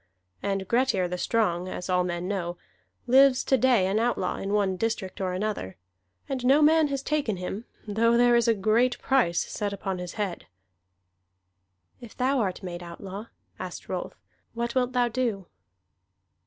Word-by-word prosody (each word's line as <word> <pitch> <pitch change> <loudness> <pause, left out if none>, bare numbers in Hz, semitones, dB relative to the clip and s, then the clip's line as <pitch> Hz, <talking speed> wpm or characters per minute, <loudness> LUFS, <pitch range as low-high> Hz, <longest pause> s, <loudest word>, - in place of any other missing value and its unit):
And 195 -1 -2
Grettir 235 -6 +2
the 180 +1 -4
Strong, 185 -6 0
as 180 - -5
all 180 -1 +2
men 175 0 -3
know, 175 -3 -3 0.5
lives 265 +1 +5
to 265 - +3
day 245 -6 +3
an 195 +3 +1
outlaw, 240 +1 0
in 195 - -4
one 200 -2 +1
district 195 -2 -3
or 185 -1 -1
another; 185 - -3 0.5
and 265 -2 -3
no 275 +4 +5
man 315 0 +5
has 275 -1 -3
taken 285 -10 -1
him, 190 +5 -5 0.2
though 230 +3 +3
there 240 0 +5
is 235 0 +3
a 230 - +4
great 225 +5 +2
price 210 -11 +2
set 205 -1 -3
upon 195 -2 -4
his 180 0 -6
head." 205 -5 -4 1.5
"If 235 -3 -12
thou 265 +2 +2
art 190 -5 -2
made 175 -1 -6
outlaw," 190 +5 -8 0.3
asked - - -7
Rolf, - - -4 0.4
"what 235 0 -2
wilt 255 -1 +1
thou 245 -1 +3
do?" 230 -5 -2
215 Hz, 165 wpm, -27 LUFS, 185-245 Hz, 1.5 s, lives